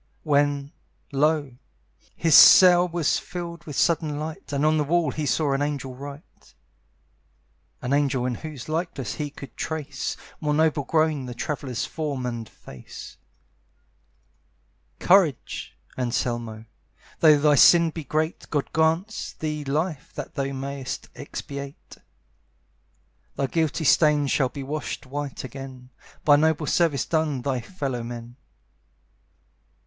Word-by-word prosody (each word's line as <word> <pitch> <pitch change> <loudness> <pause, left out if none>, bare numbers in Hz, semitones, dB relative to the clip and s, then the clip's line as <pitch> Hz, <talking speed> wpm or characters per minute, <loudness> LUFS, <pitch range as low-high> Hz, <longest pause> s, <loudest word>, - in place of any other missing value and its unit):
When, 145 -1 +1 0.4
lo! 145 -2 +1 0.6
his 165 -2 +1
cell 180 +2 +9
was 170 -3 0
filled 170 -2 -7
with 150 - -7
sudden 155 -2 +1
light, 155 0 -6
And 140 +1 0
on 155 0 +3
the 150 - +2
wall 160 0 +1
he 150 +1 -3
saw 140 +4 +1
an 135 - 0
angel 145 -3 -2
write, 140 +3 -12 1.3
(An 125 +2 -1
angel 135 -3 +1
in 125 - 0
whose 145 0 -8
likeness 155 -5 -3
he 150 -1 -4
could 140 -3 -11
trace, 145 -4 -4 0.2
More 150 -1 0
noble 155 -2 +2
grown, 155 -4 +1
the 125 - -7
traveller's 130 -2 -3
form 145 -5 -4
and 115 -3 -4
face), 65 -2 -12 1.8
"Courage, 170 - +2 0.2
Anselmo, 120 -3 -2 0.5
though 155 -2 +7
thy 150 0 +4
sin 170 +3 +6
be 160 0 -6
great, 155 +4 -2
God 145 -3 -2
grants 165 +7 0
thee 150 -1 -4
life 155 +2 -2
that - - -6
thou 135 -2 -2
may'st 135 0 -5
expiate. 140 0 -8 1.4
"Thy 140 - 0
guilty 160 +2 -1
stains 150 -2 +4
shall 130 -3 +2
be 140 +2 -7
washed 150 +1 -4
white 145 +1 -5
again, 130 0 -9 0.3
By 145 -1 +7
noble 155 0 +2
service 160 -3 +1
done 155 -6 0
thy 130 -2 -1
fellow 135 -3 -4
men. 120 +1 -8
145 Hz, 130 wpm, -25 LUFS, 135-160 Hz, 1.8 s, cell